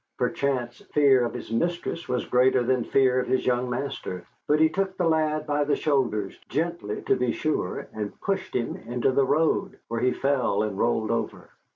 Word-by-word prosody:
Perchance 125 -4 -1 0.2
fear 140 -4 +5
of 120 - -3
his - - -7
mistress 170 +4 -2
was 125 -1 -1
greater 125 0 +3
than 125 0 +1
fear 130 0 +3
of 125 - -2
his 130 - +1
young 125 0 +1
master; 125 -7 -4 0.2
but 150 +1 +3
he 160 - +6
took 190 +2 -2
the 175 - +1
lad 155 -1 +1
by 145 -1 +1
the 145 - +1
shoulders 120 -9 0
gently, 165 -9 -2
to - - +2
be 125 -1 0
sure 155 -12 -2
and 105 -2 -5
pushed 190 -1 -2
him 120 -2 -1
into 120 +3 -1
the 135 0 +2
road, 155 +4 +1
where 115 0 -2
he 125 +1 +3
fell 135 -8 +1
and 105 -2 -3
rolled 115 -2 +1
over. 115 - -3
130 Hz, 190 wpm, -26 LUFS, 120-150 Hz, 0.2 s, he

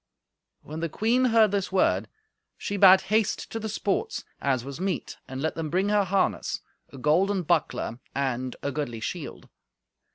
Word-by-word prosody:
When 155 +2 -7
the 165 0 -2
queen 235 - +2
heard 225 -4 +5
this 200 -1 -1
word, 190 - +2 0.5
she 205 - -3
bade 190 -1 +8
haste 215 0 0
to 225 - -3
the 220 0 -4
sports, 215 - -2 0.2
as 130 -3 0
was 140 +2 -7
meet, 190 0 -2
and 135 +1 -5
let 160 - 0
them 160 -2 -4
bring 190 +5 +1
her 205 -1 +3
harness, 190 +1 0 0.3
a - - -10
golden 180 +8 +2
buckler 155 -7 0 0.2
and 130 -2 -1
a 140 - -1
goodly 130 -5 -3
shield. 110 - -6
185 Hz, 165 wpm, -26 LUFS, 140-205 Hz, 0.5 s, bade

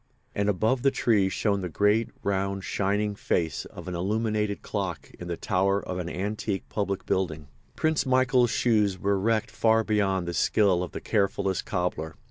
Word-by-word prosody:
And 100 0 0
above 110 +6 +1
the 135 - +4
trees 105 -7 +2
shone 100 -1 0
the 90 - -3
great, 105 +6 +2
round, 100 0 -1
shining 105 +2 0
face 80 -6 -1
of - - -10
an 90 - -4
illuminated 105 +3 -1
clock 95 -5 -4
in 90 - -7
the 85 -1 -3
tower 100 0 +1
of 90 -2 -5
an 85 -1 -3
antique 100 +1 -3
public 100 -2 -2
building. 80 -6 -1 0.3
Prince 160 -1 +1
Michael's 130 -1 +3
shoes 105 -5 +2
were 100 +1 +1
wrecked 110 +1 0
far 115 0 +3
beyond 95 -4 +1
the 85 - -2
skill 95 -1 +3
of 90 - -5
the - - -5
carefullest 100 -3 0
cobbler. 85 -3 -2
100 Hz, 170 wpm, -27 LUFS, 95-110 Hz, 0.3 s, the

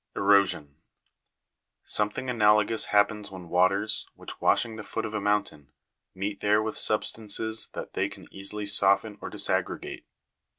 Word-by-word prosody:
Erosion. 100 -8 +2 1.1
Something 105 +5 0
analogous 105 -2 +3
happens 105 0 +1
when 90 -3 -10
waters, 100 +4 +2
which - - -10
washing 115 -2 +2
the 110 - -7
foot 110 +1 -4
of 110 - -6
a 105 - -2
mountain, 100 -9 -1 0.4
meet 100 +2 -4
there 105 +1 +3
with 110 0 -3
substances 110 +1 0
that - - -7
they - - -1
can - - -13
easily 100 +2 -3
soften 100 +1 +1
or - - -6
disaggregate. - - -3
105 Hz, 135 wpm, -27 LUFS, 100-110 Hz, 1.1 s, analogous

